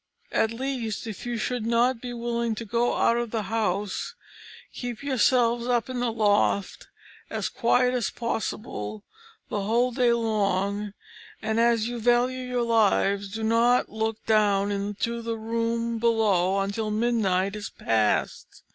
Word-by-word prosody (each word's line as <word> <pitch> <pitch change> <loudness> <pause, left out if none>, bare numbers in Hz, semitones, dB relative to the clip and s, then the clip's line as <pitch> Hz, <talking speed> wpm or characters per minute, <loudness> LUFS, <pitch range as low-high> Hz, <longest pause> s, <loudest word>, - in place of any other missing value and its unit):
At 220 - +2
least, 235 -3 -3
if 220 +1 -7
you 240 -1 -2
should 245 +1 -2
not 235 +1 +2
be 245 - -5
willing 235 -1 -2
to 230 - -6
go 235 +3 +1
out 230 - +3
of 240 -1 -2
the 220 -1 -2
house, 205 - -2 0.6
keep 245 0 -6
yourselves 240 -3 +2
up 245 0 0
in 250 - -3
the 245 -1 0
loft 205 -2 +1 0.4
as - - -2
quiet 250 +1 +2
as 245 -4 0
possible 215 - -4 0.5
the 205 - -2
whole 235 +5 +1
day 245 -1 +2
long, 205 -3 0 0.5
and 220 +1 -1
as 230 -1 +3
you 240 0 -4
value 245 +2 +2
your 250 -1 -2
lives 200 -3 +2
do 220 +2 -4
not 230 +2 +3
look 220 0 -3
down 205 -2 +3
into 205 +4 -2
the 230 0 -3
room 230 +1 -1
below 210 -5 +2
until 200 +2 -2
midnight 210 -4 +1
is 210 -1 -5
past. 110 -2 -1
230 Hz, 145 wpm, -26 LUFS, 210-240 Hz, 0.6 s, out